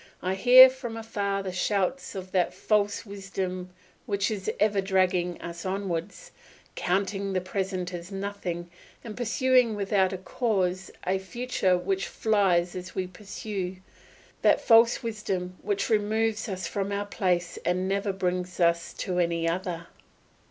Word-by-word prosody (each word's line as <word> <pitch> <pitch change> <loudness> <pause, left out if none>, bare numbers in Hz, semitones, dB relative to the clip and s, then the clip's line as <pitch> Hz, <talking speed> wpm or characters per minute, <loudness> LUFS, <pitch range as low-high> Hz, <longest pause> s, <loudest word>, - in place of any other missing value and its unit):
I 185 +1 0
hear 250 +6 +9
from 255 -3 -6
afar 200 -3 -2
the 190 - -3
shouts 200 +7 -1
of 185 -1 -6
that 185 -2 +1
false 205 0 +1
wisdom 190 -2 -5 0.4
which 200 -1 0
is 200 -3 -3
ever 205 -2 +3
dragging 185 -2 +1
us 170 -1 -7
onwards, 195 - -4 0.4
counting 195 +1 -1
the 185 - +2
present 185 -1 -3
as 175 +2 -7
nothing, 195 -3 -4 0.3
and 220 -3 -7
pursuing 250 -1 +2
without 195 -2 +1
a 190 - -3
pause 190 -2 -1 0.2
a 190 +1 +1
future 190 -2 0
which 190 +2 -1
flies 185 -5 +2
as 185 0 -7
we 185 - -1
pursue, 190 0 -5 0.7
that - - +5
false 230 +1 +5
wisdom 195 -5 -3
which 405 -1 -1
removes 220 0 +1
us 185 -1 -4
from 200 0 -2
our 200 0 -1
place 180 -4 -1
and 180 +1 0
never 200 +1 0
brings 180 -1 -2
us 170 -1 +2
to 180 -2 -2
any 170 -1 +1
other. 175 0 -2
195 Hz, 145 wpm, -27 LUFS, 180-210 Hz, 0.7 s, hear